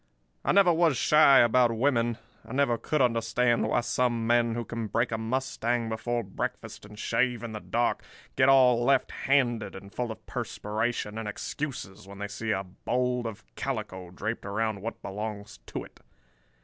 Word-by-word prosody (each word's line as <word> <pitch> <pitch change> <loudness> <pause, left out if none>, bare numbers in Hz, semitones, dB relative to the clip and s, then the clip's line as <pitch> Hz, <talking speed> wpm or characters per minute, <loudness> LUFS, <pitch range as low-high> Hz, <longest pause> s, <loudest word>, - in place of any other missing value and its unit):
"I - - +2
never 190 -3 +5
was 165 -5 +3
shy 150 -2 +6
about 120 0 +4
women. 120 -3 +1 0.3
I - - -10
never 130 -4 +2
could 150 -3 +1
understand 115 0 +2
why - - +2
some 120 0 0
men 120 0 +2
who 120 -1 -3
can 115 -2 -4
break 115 +3 0
a 110 - -1
mustang 120 -1 -1
before 120 +2 -2
breakfast 95 +1 -5
and 105 0 -13
shave 120 +2 0
in 115 - -5
the 110 - -5
dark, 120 +3 -1 0.3
get 130 0 +4
all 125 -3 +5
left 135 +1 +2
handed 120 -7 +1
and 100 +1 -11
full 120 -2 -2
of 110 - -10
perspiration 110 0 -3
and 110 - -5
excuses 105 -6 -5
when 100 0 -10
they 105 +1 -4
see 105 +2 -5
a 95 -2 0
bold 125 +6 -2
of 110 -2 -8
calico 105 -9 -4
draped 110 +6 -4
around 105 0 -2
what 115 +3 -6
belongs 105 0 -6
to - - -5
it. - - -16
115 Hz, 175 wpm, -28 LUFS, 110-125 Hz, 0.3 s, shy